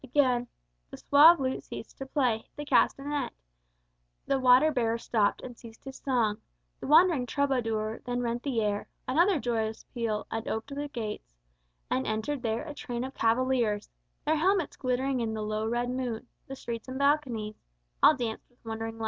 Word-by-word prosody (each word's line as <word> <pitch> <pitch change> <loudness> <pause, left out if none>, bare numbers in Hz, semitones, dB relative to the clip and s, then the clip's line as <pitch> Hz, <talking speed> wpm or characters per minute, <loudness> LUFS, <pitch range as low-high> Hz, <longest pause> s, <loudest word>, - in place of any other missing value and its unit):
Again: 255 -2 +2 0.4
The - - -9
suave 315 +4 +7
lute 260 -1 -1
ceased - - -9
to 270 - -5
play, 250 -6 0
the 295 - -6
castanet; 290 0 +1 0.9
The 275 - +1
water 255 +4 +6
bearer 230 -4 0
stopped, 220 -3 0
and 245 -2 -8
ceased 225 -1 -14
his 270 -1 -8
song 230 -6 0 0.4
The - - -6
wandering 305 -4 +5
troubadour. 225 -6 -1
Then 245 0 -2
rent 235 0 -2
the 250 -5 -1
air 205 -1 -1 0.2
Another 335 +6 +3
joyous 225 -3 -2
peal, 225 -4 -2
and 225 0 -3
oped 220 +5 -3
the 290 +1 -3
gates 215 - -6 0.6
And 130 - 0
entered 220 +6 -2
there 225 -1 -1
a 300 - -6
train 245 -4 -4
of 265 +1 -6
cavaliers, 230 -3 +1 0.3
Their 310 +1 +2
helmets 365 +1 +1
glittering 255 +1 -1
in 225 -2 -2
the 215 - -3
low 215 +1 -2
red 240 +2 -1
moon, 250 -2 -3 0.2
The 270 - -6
streets 235 -3 -6
and 260 0 -5
balconies 265 -7 0 0.4
All 310 - +7
danced 235 -4 -4
with 245 -1 -34
wondering 225 0 -4
life. - - -14
245 Hz, 175 wpm, -29 LUFS, 225-275 Hz, 0.9 s, suave